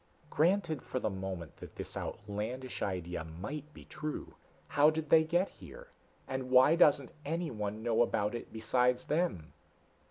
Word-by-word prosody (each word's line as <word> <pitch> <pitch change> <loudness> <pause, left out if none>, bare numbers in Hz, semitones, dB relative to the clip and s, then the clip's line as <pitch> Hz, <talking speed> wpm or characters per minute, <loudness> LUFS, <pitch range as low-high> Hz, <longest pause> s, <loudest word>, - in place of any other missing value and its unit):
"Granted 170 -3 +2
for - - -5
the 110 - -1
moment 95 -4 -5
that - - -11
this - - -6
outlandish 110 +5 -4
idea 90 -3 -2
might 105 - -7
be - - -13
true, 155 0 -5 0.4
how 145 +1 +6
did 155 -1 -3
they 160 -1 +8
get 175 +4 +2
here? - - -12 0.4
And 130 -1 -3
why 130 +5 +7
doesn't 145 -6 +4
anyone 115 -10 -3
know 115 0 +2
about 105 -2 +1
it 120 - -6
besides 125 +3 +1
them?" 150 - -1
130 Hz, 150 wpm, -33 LUFS, 105-155 Hz, 0.4 s, they